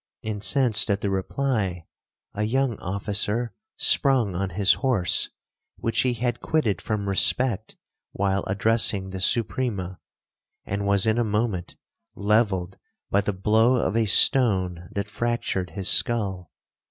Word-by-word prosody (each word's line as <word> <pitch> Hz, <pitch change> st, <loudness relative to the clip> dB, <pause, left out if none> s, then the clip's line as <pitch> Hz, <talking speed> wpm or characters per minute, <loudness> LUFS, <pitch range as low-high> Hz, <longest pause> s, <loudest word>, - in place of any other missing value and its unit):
Incensed 110 Hz, +2 st, +1 dB
at 100 Hz, 0 st, 0 dB
the 100 Hz, -, -1 dB
reply, 95 Hz, -, -2 dB, 0.5 s
a 105 Hz, -, -4 dB
young 125 Hz, +3 st, 0 dB
officer 105 Hz, +4 st, -2 dB, 0.2 s
sprung 130 Hz, -8 st, +2 dB
on 95 Hz, +2 st, -2 dB
his 100 Hz, +3 st, +3 dB
horse, 120 Hz, -10 st, 0 dB, 0.5 s
which 115 Hz, -1 st, -2 dB
he 125 Hz, -1 st, +2 dB
had 120 Hz, 0 st, -2 dB
quitted 115 Hz, -, -1 dB
from 105 Hz, -3 st, -3 dB
respect 105 Hz, +3 st, +1 dB, 0.4 s
while 100 Hz, 0 st, -1 dB
addressing 100 Hz, -1 st, +1 dB
the 95 Hz, 0 st, -6 dB
Suprema, 100 Hz, -4 st, -1 dB, 0.7 s
and 100 Hz, 0 st, -3 dB
was 100 Hz, 0 st, +2 dB
in 110 Hz, +1 st, +1 dB
a -, -, +2 dB
moment 105 Hz, -4 st, -2 dB, 0.4 s
levelled 100 Hz, -4 st, 0 dB, 0.3 s
by 100 Hz, -, +3 dB
the 105 Hz, -, -2 dB
blow 110 Hz, +6 st, +2 dB
of 115 Hz, -3 st, -1 dB
a 115 Hz, -1 st, +1 dB
stone 95 Hz, -, +4 dB
that 100 Hz, +1 st, -4 dB
fractured 110 Hz, -5 st, -2 dB
his 95 Hz, -2 st, -4 dB
skull. 100 Hz, -, +1 dB
105 Hz, 130 wpm, -24 LUFS, 95-115 Hz, 0.7 s, stone